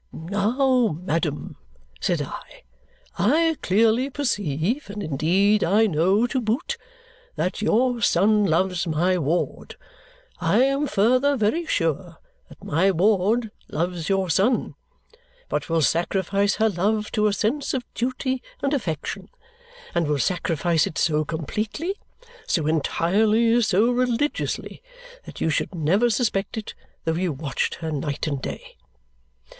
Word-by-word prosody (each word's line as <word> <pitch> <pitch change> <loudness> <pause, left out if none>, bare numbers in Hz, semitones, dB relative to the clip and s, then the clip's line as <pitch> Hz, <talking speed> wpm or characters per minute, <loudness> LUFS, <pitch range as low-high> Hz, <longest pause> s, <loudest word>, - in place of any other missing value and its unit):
'Now, 220 - +1
madam,' 165 -4 -2 0.4
said - - 0
I, - - -10 0.6
'I 325 0 +3
clearly 225 +7 +2
perceive 215 - -1
and 205 0 -5
indeed 185 +8 +2
I 210 +6 +4
know, 190 +5 +2
to 255 +1 -1
boot 245 - -1 0.6
that 185 - -2
your 240 +3 +2
son 210 +2 +3
loves 180 +1 +1
my 175 +3 +1
ward. 165 +3 -2 0.6
I - - +3
am 275 +2 +1
further 255 +6 +2
very 280 +10 0
sure 165 - -1 0.3
that - - -16
my 170 +6 +2
ward 205 +4 +2 0.2
loves 170 +1 -2
your 190 -3 +1
son, 220 +9 +1 0.8
but - - -2
will 165 -1 +2
sacrifice 195 +5 +1
her 220 +1 +2
love 210 +3 -1
to 215 0 +2
a - - +2
sense 265 +8 -1
of 250 -2 -3
duty 260 +1 -2 0.2
and 275 +1 +1
affection, 195 - -3 0.6
and 170 -2 +1
will 150 -1 +1
sacrifice 165 +2 +1
it - - -7
so 155 -2 +2
completely, 210 - -3 0.5
so 160 -5 +1
entirely, 215 +9 +2
so 215 +2 +3
religiously, 250 +3 -1 0.4
that - - -10
you 160 - +1
should 165 - -2
never 185 +9 +2
suspect 215 -4 -1
it 215 - -5 0.3
though 160 - +1
you 175 +1 -1
watched 140 0 -2
her 160 -2 -5
night 145 -1 -3
and 140 -4 -2
day.' - - -7
200 Hz, 130 wpm, -23 LUFS, 165-235 Hz, 0.8 s, I